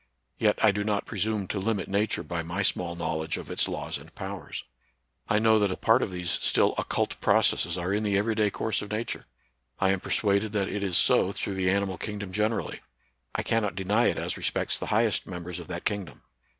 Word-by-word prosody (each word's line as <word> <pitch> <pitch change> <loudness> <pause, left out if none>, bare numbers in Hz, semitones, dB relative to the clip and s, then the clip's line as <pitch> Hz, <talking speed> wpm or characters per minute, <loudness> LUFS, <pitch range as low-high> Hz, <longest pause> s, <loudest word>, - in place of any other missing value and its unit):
Yet 105 -2 +3
I 110 - +7
do 105 +1 -1
not 105 -1 0
presume 105 -1 -1
to 100 - -1
limit 100 0 -1
Nature 100 +2 0
by 85 -2 -3
my 85 +5 -2
small 85 -2 0
knowledge 80 -2 -2
of - - -7
its - - +1
laws - - -3
and - - -15
powers. - - -6 0.7
I 105 - +4
know 110 0 +5
that 100 -1 +2
a 95 - -3
part 115 +3 +4
of - - 0
these 90 -2 -1
still - - +3
occult - - -1
processes 85 +1 +3
are 90 +2 -1
in 105 - +1
the 100 -2 +1
every 110 +3 +1
day 105 -1 +2
course 110 +2 -2
of 105 - -7
Nature; 110 +2 -3 0.5
I 95 0 +3
anl 95 -1 0
persuaded 100 +1 +1
that 100 -2 0
it 105 - -3
is 95 -3 +1
so 95 - +4
through 100 - -3
the 95 -1 +1
animal 95 -1 0
king 105 -1 -4
dom 100 -2 -6
generally; 105 +3 -1 0.6
I - - 0
cannot 105 -5 0
deny 100 +5 +2
it - - +1
as - - -2
respects - - 0
the - - -4
highest 110 -2 +2
members 90 -1 -6
of - - -9
that - - -5
kingdom. 100 -4 -3
100 Hz, 215 wpm, -28 LUFS, 95-105 Hz, 0.7 s, I